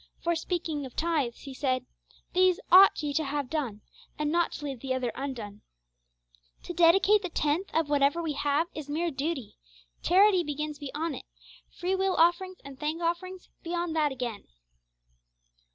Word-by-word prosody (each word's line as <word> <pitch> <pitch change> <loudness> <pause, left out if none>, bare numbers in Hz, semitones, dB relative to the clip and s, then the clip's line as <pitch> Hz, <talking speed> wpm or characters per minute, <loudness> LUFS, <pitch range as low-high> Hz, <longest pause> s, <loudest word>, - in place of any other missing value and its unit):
For, 340 0 +1
speaking 325 -3 -2
of 250 - -16
tithes, 305 -8 -1
He 275 - -8
said, 255 -2 -1 0.5
'These 370 -1 +4
ought 370 -3 +8
ye 290 -1 -1
to 315 - +1
have 285 -2 -3
done, 255 -10 -2 0.4
and 300 0 -1
not 345 0 +2
to 295 - -6
leave 270 -4 -5
the 260 +1 -2
other 250 -2 -1
undone.' 225 -7 -6 1.0
To 350 - -6
dedicate 385 +5 +5
the 365 - -4
tenth 310 +4 0
of 325 -2 +1
whatever 285 +2 +2
we 325 -3 -2
have 290 +3 +1
is 300 -2 -7
mere 330 +3 -1
duty; 280 -3 -4 0.4
charity 375 +1 +5
begins 300 -1 -4
beyond 295 +2 -4
it; - - -11 0.4
free 360 +2 -3
will 380 -1 +1
offerings 350 +3 +2
and 275 -1 -10
thank 310 +2 -2
offerings 350 +2 -3
beyond 340 -1 -3
that 300 -2 +2
again. 245 -5 -5
310 Hz, 165 wpm, -28 LUFS, 280-345 Hz, 1.0 s, ought